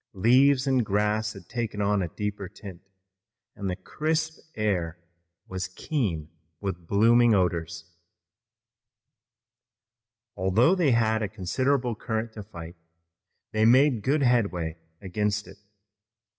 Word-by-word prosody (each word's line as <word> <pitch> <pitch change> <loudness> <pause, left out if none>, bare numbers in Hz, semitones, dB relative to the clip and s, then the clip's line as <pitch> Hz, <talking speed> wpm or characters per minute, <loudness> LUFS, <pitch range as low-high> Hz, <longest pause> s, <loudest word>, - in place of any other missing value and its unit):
Leaves 130 +7 +4
and 130 -3 +2
grass 105 +1 0
had - - -13
taken 115 -4 -4
on 100 0 +2
a 90 - -1
deeper 105 +1 -5
tint, 95 -3 -11 0.7
and 100 -1 -4
the 90 - -2
crisp 155 - -2 0.2
air 90 -6 -1 0.5
was 95 0 -4
keen 95 - -2 0.3
with 90 -4 -5
blooming 115 +3 +5
odors. 85 -2 -2 2.4
Although 100 - +3
they 175 -6 +2
soon 115 - +4
had 110 -1 +1
a 105 - 0
considerable 125 +6 0
current 110 +1 -3
to 110 - -7
fight, 85 -4 -10 0.7
they 110 0 +1
made 125 +1 +5
good 140 +6 +1
headway 95 -10 +1 0.2
against 105 +2 -2
it. - - -13
105 Hz, 120 wpm, -26 LUFS, 95-120 Hz, 2.4 s, blooming